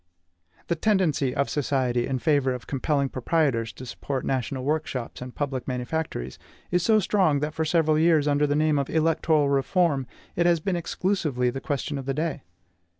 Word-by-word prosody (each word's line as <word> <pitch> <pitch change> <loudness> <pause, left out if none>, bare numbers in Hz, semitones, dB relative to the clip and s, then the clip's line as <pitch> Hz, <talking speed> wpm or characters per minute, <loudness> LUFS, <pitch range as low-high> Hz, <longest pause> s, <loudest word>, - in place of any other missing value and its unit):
The 170 - 0
tendency 165 -9 +1
of 140 - +1
society 130 -4 0
in 135 - -1
favor 135 -2 +2
of 125 - -9
compelling 140 +1 0
proprietors 130 -4 0
to 130 - -10
support 135 +2 -4
national 130 0 -2
workshops 145 -5 -3
and 125 0 -8
public 135 -4 -3
manufactories 125 - -3 0.3
is 180 0 +2
so 215 +5 +4
strong 185 -7 +2
that 150 +1 -2
for 160 0 -1
several 155 -1 +2
years, 160 -3 +4
under 145 0 +2
the 145 - +1
name 155 -1 +2
of 140 - -2
ELECTORAL 160 -2 +2
REFORM, 140 0 +1 0.3
it 170 0 +2
has 170 -1 +3
been 185 +3 -1
exclusively 160 -8 -1
the 135 - -6
question 145 0 -3
of 135 - -8
the 135 - -1
day. 155 0 -2
145 Hz, 175 wpm, -25 LUFS, 130-160 Hz, 0.3 s, so